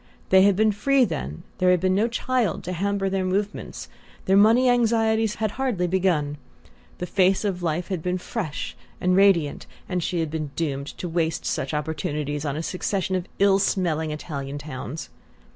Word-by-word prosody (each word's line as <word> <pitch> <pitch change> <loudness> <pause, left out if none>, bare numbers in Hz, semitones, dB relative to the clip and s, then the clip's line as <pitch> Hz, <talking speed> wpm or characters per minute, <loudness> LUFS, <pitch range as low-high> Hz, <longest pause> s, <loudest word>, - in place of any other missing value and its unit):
They 190 0 +7
had 200 0 +5
been 215 +2 +3
free 260 +6 +3
then, 135 - -5 0.2
there 185 -1 +4
had 180 -1 +4
been 185 +1 +2
no 210 +4 +2
child 240 -3 -1
to 180 - -4
hamper 200 +2 0
their 190 0 0
movements, 200 +3 -3 0.4
their 190 - +3
money 225 +5 +6
anxieties 225 -2 +2
had 215 -2 -1
hardly 240 -8 -1
begun, 170 -6 0 0.6
the 180 - -3
face 190 +2 +2
of 185 -3 -1
life 170 +1 -1
had 185 -4 -2
been 180 +2 -1
fresh 180 -6 -4 0.2
and 180 0 +2
radiant, 185 -7 +3 0.2
and 180 -1 -1
she 175 +1 -1
had 160 -2 -1
been 155 -2 -3
doomed 140 -4 -2
to 180 - -4
waste 165 -1 -1
such - - -1
opportunities 150 -1 -2
on 145 0 -2
a 160 - -3
succession 190 +1 -1
of 185 -1 -2
ill 195 0 +4
smelling 165 -5 0
Italian 145 -2 -5
towns. 145 -1 -7
185 Hz, 175 wpm, -24 LUFS, 160-200 Hz, 0.6 s, They